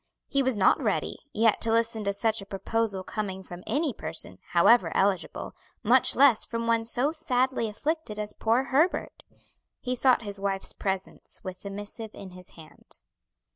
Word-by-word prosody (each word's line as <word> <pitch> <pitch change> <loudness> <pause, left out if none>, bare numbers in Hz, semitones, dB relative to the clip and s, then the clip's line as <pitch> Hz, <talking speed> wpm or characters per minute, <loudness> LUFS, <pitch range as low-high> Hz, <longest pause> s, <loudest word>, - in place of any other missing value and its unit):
He 275 - +1
was 260 -4 +1
not 190 - +4
ready, - - -1
yet 225 -2 +2
to 225 - +2
listen 230 -1 +1
to 200 - 0
such 220 +1 0
a - - -9
proposal 200 0 -1
coming 190 -2 -4
from 175 -1 -10
any 295 -2 0
person, 155 - -5
however 205 +8 +4
eligible, 195 -1 0 0.3
much - - +5
less 270 -6 +5
from 230 0 -3
one 230 -1 +1
so 250 +5 0
sadly 260 -6 0
afflicted 295 0 -3
as 210 0 -4
poor 230 +4 +1
Herbert. 295 +7 0 0.6
He 250 0 -2
sought 250 -1 +3
his 200 -1 -5
wife's 195 -1 -2
presence 190 -1 -4
with 185 -1 -7
the 200 - -6
missive 205 +3 -7
in 190 -2 -9
his 180 0 -13
hand. 160 -1 -13
220 Hz, 170 wpm, -27 LUFS, 195-245 Hz, 0.6 s, much